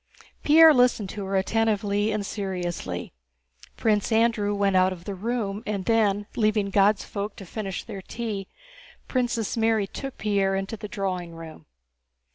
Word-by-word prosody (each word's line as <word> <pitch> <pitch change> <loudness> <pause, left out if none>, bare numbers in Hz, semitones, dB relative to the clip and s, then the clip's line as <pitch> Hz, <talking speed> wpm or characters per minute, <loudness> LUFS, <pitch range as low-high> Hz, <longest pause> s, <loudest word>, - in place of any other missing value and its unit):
Pierre 320 +1 +8
listened 245 -6 +3
to 205 -2 -5
her 195 +1 -2
attentively 205 0 +1
and 210 -1 -2
seriously. 175 - -4 0.6
Prince 215 0 +1
Andrew 220 -2 +2
went 200 -1 +1
out 185 0 +4
of 175 -2 -8
the 200 - -4
room, 210 0 -3
and 200 -3 -2
then, 210 -3 +2
leaving 215 -2 +1
"God's 200 +1 +3
folk" 205 0 -5
to 195 - -10
finish 195 0 -5
their 200 -4 -7
tea, 205 -2 -5 0.6
Princess 245 -4 -1
Mary 225 -2 +2
took 270 +7 -7
Pierre 200 -2 +1
into 195 +3 -3
the 210 -1 -7
drawing 185 -4 -4
room. 160 - -11
205 Hz, 150 wpm, -25 LUFS, 195-225 Hz, 0.6 s, Pierre